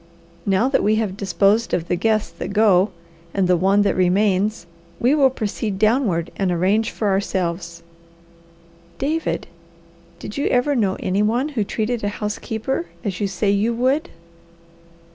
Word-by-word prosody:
Now 195 Hz, +5 st, +3 dB
that 270 Hz, -, +2 dB
we 215 Hz, +1 st, +2 dB
have 215 Hz, -4 st, -1 dB
disposed 200 Hz, +4 st, +2 dB
of 170 Hz, -1 st, -3 dB
the -, -, +1 dB
guests 215 Hz, +3 st, 0 dB
that -, -, -4 dB
go 205 Hz, -2 st, +4 dB, 0.5 s
and 195 Hz, -2 st, +2 dB
the 180 Hz, -, +4 dB
one 195 Hz, +4 st, +3 dB
that 205 Hz, -, +1 dB
remains, 190 Hz, +2 st, +1 dB, 0.3 s
we 250 Hz, +4 st, +3 dB
will 280 Hz, -3 st, +5 dB
proceed 215 Hz, -4 st, -3 dB
downward 215 Hz, -6 st, +1 dB
and 190 Hz, -2 st, 0 dB
arrange 195 Hz, +6 st, +1 dB
for 210 Hz, -, -2 dB
ourselves." 175 Hz, -3 st, -2 dB, 1.1 s
"David, 315 Hz, +4 st, -1 dB, 0.7 s
did -, -, -8 dB
you 285 Hz, -, 0 dB
ever 255 Hz, +4 st, +2 dB
know 200 Hz, -6 st, +1 dB
any 190 Hz, +2 st, 0 dB
one 240 Hz, +7 st, +1 dB
who 250 Hz, -8 st, -1 dB
treated 220 Hz, +3 st, -2 dB
a 205 Hz, -, +1 dB
housekeeper 220 Hz, +8 st, -3 dB, 0.2 s
as 195 Hz, -5 st, -3 dB
you 205 Hz, -, +1 dB
say 195 Hz, +1 st, 0 dB
you 215 Hz, +4 st, +1 dB
would?" 260 Hz, +6 st, +1 dB
210 Hz, 155 wpm, -21 LUFS, 190-230 Hz, 1.1 s, will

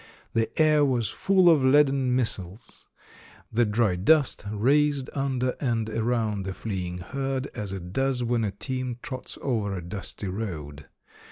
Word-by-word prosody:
The 115 Hz, 0 st, +1 dB
air 155 Hz, -1 st, +5 dB
was 125 Hz, -5 st, +1 dB
full 190 Hz, -2 st, +3 dB
of 160 Hz, -5 st, +6 dB
leaden 135 Hz, -2 st, +4 dB
missiles; 105 Hz, -4 st, -4 dB, 0.6 s
the 120 Hz, +1 st, +3 dB
dry 105 Hz, -3 st, +1 dB
dust 140 Hz, -, +3 dB
raised 140 Hz, +6 st, +2 dB
under 130 Hz, -2 st, 0 dB
and 115 Hz, -5 st, 0 dB
around 110 Hz, -3 st, 0 dB
the 95 Hz, -1 st, -5 dB
fleeing 90 Hz, -5 st, -4 dB
herd 135 Hz, +7 st, -3 dB
as 105 Hz, -4 st, -5 dB
it 90 Hz, -2 st, -7 dB
does 135 Hz, -1 st, 0 dB
when 120 Hz, -1 st, +1 dB
a 105 Hz, -, 0 dB
team 130 Hz, +4 st, -4 dB
trots 130 Hz, -2 st, -6 dB
over 110 Hz, -7 st, -1 dB
a 90 Hz, -, -6 dB
dusty 100 Hz, +2 st, -6 dB
road. 80 Hz, -8 st, -5 dB
120 Hz, 150 wpm, -26 LUFS, 100-135 Hz, 0.6 s, of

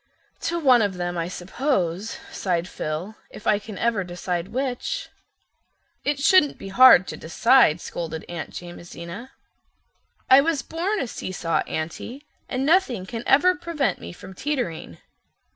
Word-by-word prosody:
"To 340 Hz, -, -1 dB
one 260 Hz, -7 st, +5 dB
of 200 Hz, -3 st, 0 dB
them, 175 Hz, 0 st, -3 dB
I 165 Hz, -1 st, -2 dB
suppose," 190 Hz, -, -2 dB
sighed 175 Hz, -2 st, -1 dB
Phil, 160 Hz, +5 st, -4 dB, 0.2 s
"if 210 Hz, -, -12 dB
I 210 Hz, -1 st, +3 dB
can 210 Hz, -1 st, -9 dB
ever 230 Hz, -4 st, +1 dB
decide 175 Hz, 0 st, -3 dB
which." 265 Hz, -, -3 dB, 0.9 s
"It 290 Hz, -1 st, 0 dB
shouldn't 295 Hz, 0 st, +4 dB
be 195 Hz, -, -8 dB
hard 215 Hz, -3 st, +8 dB
to -, -, -6 dB
decide," 225 Hz, 0 st, +4 dB
scolded 160 Hz, -2 st, -6 dB
Aunt 170 Hz, -2 st, -6 dB
Jamesina. 175 Hz, +5 st, -9 dB, 1.0 s
"I 265 Hz, +1 st, +8 dB
was 310 Hz, -1 st, 0 dB
born 370 Hz, +6 st, -2 dB
a -, -, -1 dB
see 190 Hz, -, -6 dB
saw 165 Hz, -2 st, -1 dB
Aunty, 230 Hz, -, -5 dB, 0.2 s
and 260 Hz, +1 st, -1 dB
nothing 285 Hz, -, +2 dB
can 230 Hz, +3 st, -5 dB
ever 355 Hz, +7 st, +5 dB
prevent 330 Hz, -, -2 dB
me 85 Hz, -, -7 dB
from 190 Hz, -, -11 dB
teetering." 185 Hz, -, -3 dB
215 Hz, 145 wpm, -24 LUFS, 175-275 Hz, 1.0 s, hard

